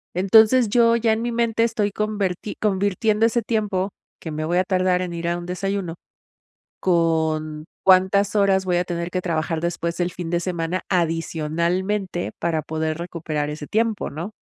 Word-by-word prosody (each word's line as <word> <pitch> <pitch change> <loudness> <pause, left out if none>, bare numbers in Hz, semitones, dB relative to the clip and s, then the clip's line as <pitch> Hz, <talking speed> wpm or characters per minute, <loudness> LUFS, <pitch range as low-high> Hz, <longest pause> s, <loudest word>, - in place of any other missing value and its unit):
Entonces 220 +5 +5
yo 230 +1 +4
ya 230 -1 +2
en 220 - -2
mi 240 0 -2
mente 230 -1 +1
estoy 220 -3 0
converti 205 -2 -2
convirtiendo 210 +2 +1
ese 235 +1 0
tiempo, 205 -4 -1 0.3
que 160 - -6
me 155 +1 -3
voy 175 +2 0
a 185 - +4
tardar 185 -1 +1
en 175 - -5
ir 170 0 -4
a 175 0 0
un 175 - -7
desayuno, 185 -1 -3 0.8
con 160 -3 0 0.2
cuántas 190 +2 +4
horas 195 -2 +3
voy 180 -1 +1
a 175 - +1
tener 170 0 -4
que 180 0 -2
trabajar 165 -2 -1
después, 170 0 -2
el 175 0 0
fin 175 -1 -6
de 170 0 +1
semana 170 0 -2
adicionalmente, 170 +3 -1
para 165 -2 0
poder 155 +1 -3
recuperar 155 -4 -3
ese 150 0 -6
tiempo, 220 +2 -1
¿no? 165 +7 -5
180 Hz, 170 wpm, -22 LUFS, 170-205 Hz, 0.8 s, Entonces